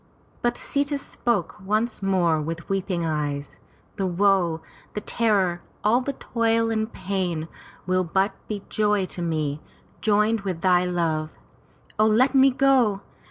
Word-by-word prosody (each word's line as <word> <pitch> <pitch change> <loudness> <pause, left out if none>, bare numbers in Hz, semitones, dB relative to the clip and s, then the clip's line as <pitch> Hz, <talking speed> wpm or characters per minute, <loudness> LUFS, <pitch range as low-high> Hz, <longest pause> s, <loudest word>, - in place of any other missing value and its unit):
But 240 0 0
Sita 285 +1 -1
spoke 235 - -2
once 215 +4 0
more 175 -5 +2
with 165 +2 -5
weeping 190 -3 -1
eyes: 145 -2 -3 0.4
"The 195 - 0
woe, 180 -3 +2 0.3
the 210 - -2
terror, 200 -7 +1 0.2
all 230 +4 +4
the 275 +2 -3
toil 230 -2 0
and 220 0 -1
pain 180 -4 -2 0.4
will 185 +1 +2
but 190 +4 +1 0.2
be 205 -2 -4
joy 210 -2 +1
to 180 - -6
me, 155 -3 -1 0.4
joined 215 +1 +2
with 185 -4 -4
thy 180 -1 +4
love. 165 -3 -1 0.6
O 215 - +5
let 250 +5 +4
me 270 0 +6
go! 255 -6 +3
195 Hz, 140 wpm, -24 LUFS, 170-225 Hz, 0.6 s, me